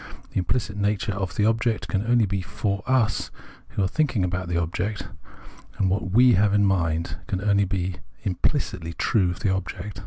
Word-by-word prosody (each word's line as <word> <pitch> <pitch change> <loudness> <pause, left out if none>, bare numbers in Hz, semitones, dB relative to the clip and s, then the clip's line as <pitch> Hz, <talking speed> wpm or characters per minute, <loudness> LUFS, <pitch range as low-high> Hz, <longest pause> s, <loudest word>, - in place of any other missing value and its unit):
Tlie - - -2
implicit 105 +3 -1
nature 105 +2 0
of 95 -3 -3
the 105 - +2
object 115 0 +1
can 100 0 0
only 120 -2 +4
be 100 -1 -2
"for 100 +2 -2
us" 125 -5 +2 0.4
who 100 - -2
are - - +2
tliinking 135 -6 +1
about 90 0 -2
the 85 -1 -1
object: 90 +5 -2 0.7
and 95 -2 +2
what 100 +3 +1 0.2
m 125 0 +7
have 100 +1 +3
in 100 0 +4
mind 85 -3 0
can 95 - -1
only 100 0 +3
be 90 -1 -2 0.3
implidtly 90 - -1
true 95 -6 +2
of 90 - -5
the 100 - +2
object. 95 +2 -4
100 Hz, 185 wpm, -25 LUFS, 90-105 Hz, 0.7 s, m